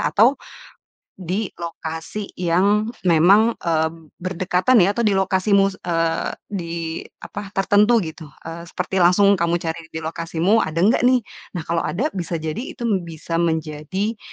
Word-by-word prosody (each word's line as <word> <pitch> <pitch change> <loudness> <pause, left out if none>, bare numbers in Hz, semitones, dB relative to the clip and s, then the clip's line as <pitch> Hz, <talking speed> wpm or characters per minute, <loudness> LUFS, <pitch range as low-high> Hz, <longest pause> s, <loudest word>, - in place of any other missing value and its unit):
atau 225 - +3 0.8
di 190 +3 -3
lokasi 165 +4 -6
yang 200 +5 +2 0.2
memang, 195 +8 +5
eee, 160 -2 +1 0.3
berdekatan 185 +5 +2
ya, 195 - +3
atau 235 +3 -1
di 200 - +2
lokasimu, 195 +1 +2 0.2
eee, 165 -1 0 0.2
di 170 -4 -4 0.5
apa, 205 -1 -7
tertentu 210 +3 +4
gitu, 160 -1 -8 0.2
eee, 170 +1 -8
seperti 185 +2 -2
langsung 195 +2 +5
kamu 170 0 +1
cari 165 0 -3 0.2
di 160 - -4
lokasimu, 165 +6 +1
ada 160 +1 -3
enggak 220 +5 +4
nih? 250 -3 +3 0.3
Nah 170 - -3
kalau 170 +1 -1
ada, 235 - -1
bisa 175 -2 -4
jadi 155 +2 -3 0.2
itu - - -7 0.2
bisa 165 +1 -4
menjadi 165 +6 -2
180 Hz, 140 wpm, -21 LUFS, 165-205 Hz, 0.8 s, memang